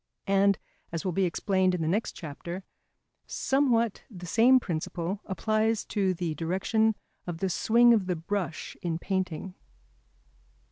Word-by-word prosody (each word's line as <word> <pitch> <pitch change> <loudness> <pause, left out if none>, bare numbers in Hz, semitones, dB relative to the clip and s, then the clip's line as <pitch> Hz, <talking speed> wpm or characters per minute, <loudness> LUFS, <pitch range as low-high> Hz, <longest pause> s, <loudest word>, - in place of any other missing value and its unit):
And, 200 0 +3 0.3
as 165 +1 -4
will 185 - +1
be 190 +2 +1
explained 185 +1 +1
in 170 - -2
the - - -1
next 205 +7 0
chapter, 170 +4 -7 0.6
somewhat 240 -5 +1
the 180 -6 -9
same 240 +8 +5
principle 175 +1 -3
applies 215 +3 0
to 195 -3 0
the 170 -2 -2
direction 195 +7 +1 0.3
of 175 -2 -3
the 190 +3 -1
swing 235 +6 +5
of 205 -5 +1
the 180 - 0
brush 175 +1 -3
in 170 -4 -1
painting. 185 -1 -3
190 Hz, 140 wpm, -28 LUFS, 170-215 Hz, 0.6 s, same